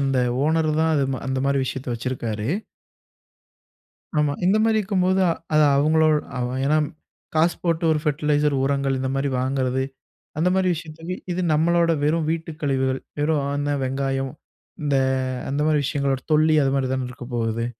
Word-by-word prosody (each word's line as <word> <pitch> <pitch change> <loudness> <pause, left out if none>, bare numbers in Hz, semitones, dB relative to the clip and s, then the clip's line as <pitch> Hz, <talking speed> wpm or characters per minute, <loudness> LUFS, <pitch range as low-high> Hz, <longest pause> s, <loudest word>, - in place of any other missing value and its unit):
அந்த 135 -1 +1 0.3
ஓனர் 160 0 +2
தான் 160 0 +2
அதுமா 135 -2 0
அந்த 130 0 -1
மாரி 140 0 +2
விஷயத்தை 130 0 -4
வச்சிருக்காரு. 115 -3 -3 1.7
ஆமா, 150 -1 +2
இந்த 190 +4 +4
மாரி 225 -1 +3
இருக்கும்போது. 190 -2 +1
அ - - +3 0.2
அது 155 0 +6
அவங்களோடு 155 +1 +4 0.2
அவ 125 - -1 0.2
ஏன்னா, 150 +2 +3 0.6
காசு 165 +2 +3
போட்டு 165 -1 0
ஒரு 155 - +1
ஃபெர்டிலைசர் 150 0 +1
உரங்கள் 140 -1 0
இந்த 130 0 -2
மாதிரி 135 +1 0
வாங்குறது, 130 0 0 0.6
அந்த 180 +3 +3
மாரி 190 -1 +2
விஷயத்துக்கு 165 +2 -6 0.2
இது 180 - -1
நம்மளோட 170 +2 +3
வெறும் 155 +1 +1
வீட்டு 165 0 -3
கழிவுகள். 130 -2 0 0.2
வெறும் 150 -1 +1
அந்த 145 0 0
வெங்காயம், 135 0 -1 0.5
இந்த 145 -1 +1 0.6
அந்த 140 +2 0
மாரி 155 -1 +3
விஷயங்களோட 140 -2 -1
தொல்லி, 155 +1 +4
அது 135 - +1
மாதிரி 135 -2 0
தான 130 -1 -2
இருக்கப்போகுது. 120 -3 -3
145 Hz, 150 wpm, -23 LUFS, 135-160 Hz, 1.7 s, அது